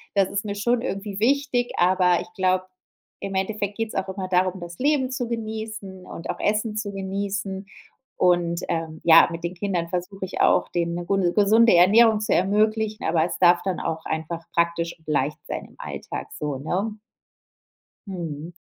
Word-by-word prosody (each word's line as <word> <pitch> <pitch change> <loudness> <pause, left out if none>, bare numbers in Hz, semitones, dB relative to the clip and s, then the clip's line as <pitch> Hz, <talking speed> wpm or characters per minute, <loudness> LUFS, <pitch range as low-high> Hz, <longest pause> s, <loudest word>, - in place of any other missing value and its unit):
das 195 -2 +3
ist 200 - -2
mir 205 -1 -4
schon 235 +4 +1
irgendwie 200 -3 -4
wichtig, 255 -1 +1
aber 180 -1 +4
ich - - -9
glaube, 185 0 +1 0.6
im 195 -1 -4
Endeffekt 200 +1 -2
geht's 225 -1 -3
auch 195 0 -1
immer 190 -1 -5
darum, 185 0 +1
das 170 0 -8
Leben 270 -2 +1
zu 250 -2 -2
genießen 220 -4 -5
und 165 - -8
auch - - -3
Essen 210 +1 0
zu 205 -1 -3
genießen. 195 0 -3 0.5
Und, 175 -1 +2
ähm, 165 -2 -3
ja, 165 0 +8
mit 165 0 -6
den 175 +1 -3
Kindern 175 -2 -2
versuche 185 +2 -4
ich 185 - -4
auch, - - +3
denen 170 -1 -1
'ne 175 - -4
gu 195 - +1
'ne 175 -3 +1
gesunde 220 +2 +5
Ernährung 215 +5 +6
zu 210 - 0
ermöglichen, 215 +3 +1
aber 160 -1 +2
es 175 - -4
darf 175 -1 +5
dann 190 -2 -2
auch 160 0 -3
einfach 160 +1 -4
praktisch 170 0 0
und 160 - -29
leicht 145 0 0
sein - - -4
im - - -18
Alltag, - - -6
so, 145 -3 -2
ne? 200 +9 -3 1.1
Mhm. 170 -4 -6
190 Hz, 180 wpm, -24 LUFS, 170-210 Hz, 1.1 s, ja